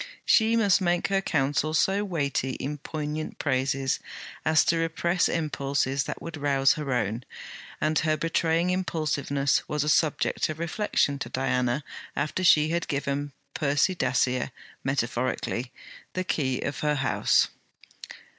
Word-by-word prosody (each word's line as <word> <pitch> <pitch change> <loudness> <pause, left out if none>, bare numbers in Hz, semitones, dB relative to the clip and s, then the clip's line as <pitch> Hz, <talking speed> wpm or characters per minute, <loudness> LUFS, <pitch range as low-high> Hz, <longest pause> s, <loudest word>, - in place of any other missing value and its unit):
She 225 0 +4
must 205 -4 +4
make 175 0 +1
her 195 0 +2
counsel 150 -1 0
so 195 +6 +2
weighty 140 -8 -1
in 145 +3 -4
poignant 155 +1 -4
praises 135 -1 0 0.4
as 160 0 +4
to 170 - +2
repress 170 +2 +1
impulses 140 -3 -1
that - - -5
would 165 -1 -6
rouse 140 -2 +3
her 150 -4 -4
own; 115 -1 -1 0.6
and 155 0 +2
her 155 -1 +1
betraying 165 +2 +1
impulsiveness 150 -6 0
was 150 -1 0
a 150 - 0
subject 155 0 +1
of 155 - -4
reflection 165 -4 0
to - - -4
Diana 125 +1 0 0.3
after 155 +5 -1
she 155 -3 +5
had 170 0 -1
given 140 0 -2 0.2
Percy 145 +5 +2
Dacier, 130 -4 +1 0.3
metaphorically, 125 -1 -1 0.4
the 185 - -1
key 130 -8 -1
of 145 - -3
her 150 0 +1
house. 135 -2 +2
150 Hz, 135 wpm, -27 LUFS, 135-165 Hz, 0.6 s, she